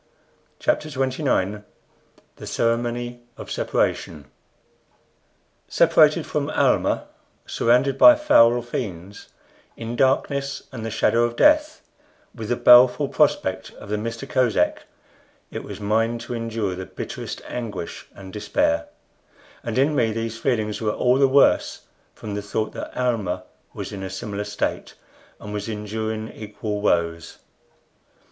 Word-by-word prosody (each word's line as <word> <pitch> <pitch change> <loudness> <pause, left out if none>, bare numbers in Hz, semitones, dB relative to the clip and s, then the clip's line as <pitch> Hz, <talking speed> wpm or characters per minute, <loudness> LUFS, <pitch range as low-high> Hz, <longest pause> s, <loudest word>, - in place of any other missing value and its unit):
CHAPTER 305 - 0
XXIX 130 -7 -1 0.7
THE - - -9
CEREMONY 120 +1 -1 0.2
OF - - -9
SEPARATION 75 -4 -1 1.4
Separated - - +4
from - - -2
Almah, - - +1 0.4
surrounded 125 +3 +2
by 305 0 +9
foul 120 - +5
fiends, 100 -5 -6 0.5
in 115 +1 -5
darkness 140 +2 0
and 120 -4 -7
the 115 - -3
shadow 115 +1 +2
of 120 0 -1
death, 305 - +3 0.5
with 110 -3 -7
the 120 - +2
baleful 125 +4 +6
prospect 95 -11 +1
of 100 - -13
the 105 - -1
Mista 115 +3 -5
Kosek, 120 -10 +1 0.6
it - - -6
was - - -8
mine 110 +3 0
to 120 - -7
endure 115 -4 -2
the 95 +1 -7
bitterest - - -7
anguish 105 -8 -6
and 95 -1 -11
despair; 85 -5 0 0.8
and 115 0 -3
in 140 +4 +3
me 115 -4 +2
these 115 +1 -4
feelings 110 -3 -1
were 110 - 0
all 125 +4 +2
the 135 - +5
worse 140 +1 +3 0.3
from 105 - -7
the 105 - -3
thought 110 +2 -3
that - - -6
Almah 105 -8 -1 0.3
was - - -6
in 100 - -7
a 95 - -5
similar 100 +2 -5
state, 100 0 -3 0.4
and 105 - -8
was 105 +1 -4
enduring 110 +1 -4
equal 105 -1 -5
woes. 85 -4 0
115 Hz, 130 wpm, -23 LUFS, 105-125 Hz, 1.4 s, by